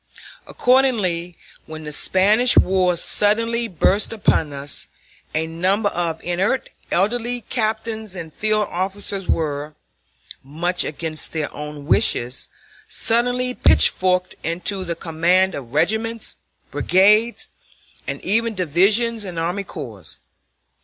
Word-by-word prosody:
Accordingly, 205 Hz, -10 st, +1 dB, 0.3 s
when 155 Hz, 0 st, -8 dB
the 150 Hz, -, -6 dB
Spanish 210 Hz, +10 st, +3 dB
War 185 Hz, -2 st, +3 dB
suddenly 230 Hz, +6 st, 0 dB
burst 195 Hz, +2 st, +1 dB
upon 180 Hz, -8 st, +1 dB
us, 140 Hz, 0 st, -6 dB, 0.5 s
a 160 Hz, +1 st, +1 dB
number 185 Hz, +6 st, 0 dB
of 165 Hz, -3 st, -3 dB
inert 190 Hz, +9 st, -1 dB, 0.2 s
elderly 240 Hz, +5 st, 0 dB
captains 220 Hz, -2 st, -2 dB
and 165 Hz, -3 st, -7 dB
field 215 Hz, -1 st, 0 dB
officers 195 Hz, +1 st, -3 dB
were, 150 Hz, -1 st, -2 dB, 0.7 s
much 175 Hz, +6 st, -1 dB
against 155 Hz, +1 st, -5 dB
their 155 Hz, -3 st, -3 dB
own 150 Hz, -1 st, -8 dB
wishes, 125 Hz, -2 st, +2 dB, 0.4 s
suddenly 245 Hz, +2 st, +1 dB
pitchforked 185 Hz, -5 st, +3 dB
into 180 Hz, +4 st, -1 dB
the 170 Hz, -2 st, -3 dB
command 175 Hz, +3 st, +1 dB
of 130 Hz, -1 st, -8 dB
regiments, 220 Hz, +7 st, 0 dB, 0.4 s
brigades, 210 Hz, +5 st, +3 dB, 0.6 s
and -, -, -3 dB
even 225 Hz, +2 st, 0 dB
divisions 200 Hz, +7 st, +2 dB
and 180 Hz, -4 st, -7 dB
army 175 Hz, +5 st, -2 dB
corps. 115 Hz, -, -9 dB
185 Hz, 110 wpm, -21 LUFS, 165-220 Hz, 0.7 s, Spanish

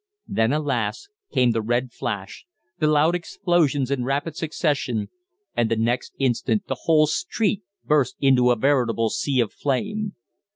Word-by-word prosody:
Then, 115 Hz, +2 st, +1 dB
alas! 150 Hz, -, -1 dB, 0.2 s
came 125 Hz, -1 st, +3 dB
the 115 Hz, 0 st, 0 dB
red 120 Hz, +3 st, -1 dB
flash, 100 Hz, -, -5 dB, 0.3 s
the 155 Hz, -, +2 dB
loud 155 Hz, +2 st, +4 dB
explosions 170 Hz, -6 st, 0 dB
in 135 Hz, -3 st, 0 dB
rapid 140 Hz, +4 st, -2 dB
succession, 145 Hz, -, -1 dB, 0.5 s
and 115 Hz, -2 st, +1 dB
the 115 Hz, -, +2 dB
next 115 Hz, +3 st, -1 dB
instant 135 Hz, -, 0 dB
the -, -, -3 dB
whole 155 Hz, -2 st, +5 dB
street 210 Hz, -, -1 dB, 0.2 s
burst 145 Hz, -5 st, +2 dB
into 130 Hz, -3 st, +4 dB
a 120 Hz, -, +4 dB
veritable 115 Hz, -3 st, +1 dB
sea 135 Hz, -3 st, 0 dB
of 115 Hz, -, -2 dB
flame. 205 Hz, +9 st, -2 dB
140 Hz, 150 wpm, -23 LUFS, 120-155 Hz, 0.5 s, whole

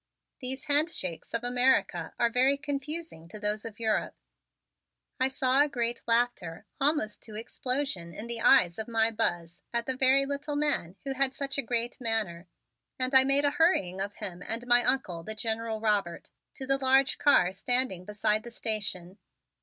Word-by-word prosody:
These 265 Hz, +1 st, -4 dB
handshakes 290 Hz, -, 0 dB
of 230 Hz, 0 st, -3 dB
America 245 Hz, -9 st, +1 dB
are 235 Hz, -1 st, +1 dB
very 260 Hz, +4 st, +3 dB
confusing 285 Hz, -, -6 dB
to 210 Hz, +5 st, -10 dB
those 210 Hz, +1 st, -1 dB
of 225 Hz, -1 st, -9 dB
Europe. 220 Hz, -2 st, -1 dB, 1.0 s
I 260 Hz, -, +3 dB
saw 265 Hz, 0 st, +2 dB
a 295 Hz, -, +2 dB
great 240 Hz, -3 st, -2 dB
laughter 230 Hz, -8 st, -1 dB
almost 275 Hz, -7 st, 0 dB
to 215 Hz, -, -9 dB
explosion 235 Hz, -5 st, -3 dB
in 210 Hz, +7 st, -7 dB
the 235 Hz, -1 st, -2 dB
eyes 180 Hz, -9 st, +4 dB
of 220 Hz, -, -4 dB
my 225 Hz, -1 st, +1 dB
Buzz 175 Hz, -5 st, -2 dB
at 235 Hz, 0 st, -1 dB
the 260 Hz, -, -2 dB
very 265 Hz, +1 st, +4 dB
little 285 Hz, +1 st, -4 dB
man 290 Hz, -, 0 dB
who 275 Hz, -1 st, -3 dB
had 270 Hz, 0 st, +2 dB
such 280 Hz, 0 st, -3 dB
a -, -, +2 dB
great 240 Hz, +1 st, -2 dB
manner, 210 Hz, -7 st, -1 dB, 0.5 s
and 255 Hz, +1 st, -1 dB
I 265 Hz, 0 st, +7 dB
made 275 Hz, +2 st, +3 dB
a 285 Hz, -, +3 dB
hurrying 195 Hz, -, +1 dB
of 200 Hz, +1 st, -3 dB
him 185 Hz, -4 st, -5 dB
and 230 Hz, +2 st, -3 dB
my 245 Hz, 0 st, +5 dB
Uncle, 210 Hz, -12 st, 0 dB
the 215 Hz, +6 st, -6 dB
General 225 Hz, 0 st, -1 dB
Robert, 205 Hz, -6 st, -1 dB, 0.2 s
to 265 Hz, -, -6 dB
the 270 Hz, +1 st, +2 dB
large 265 Hz, 0 st, +4 dB
car 185 Hz, -11 st, +4 dB
standing 195 Hz, -2 st, -1 dB
beside 210 Hz, +2 st, 0 dB
the 235 Hz, -, -10 dB
station. 205 Hz, -5 st, -3 dB
235 Hz, 175 wpm, -28 LUFS, 210-270 Hz, 1.0 s, I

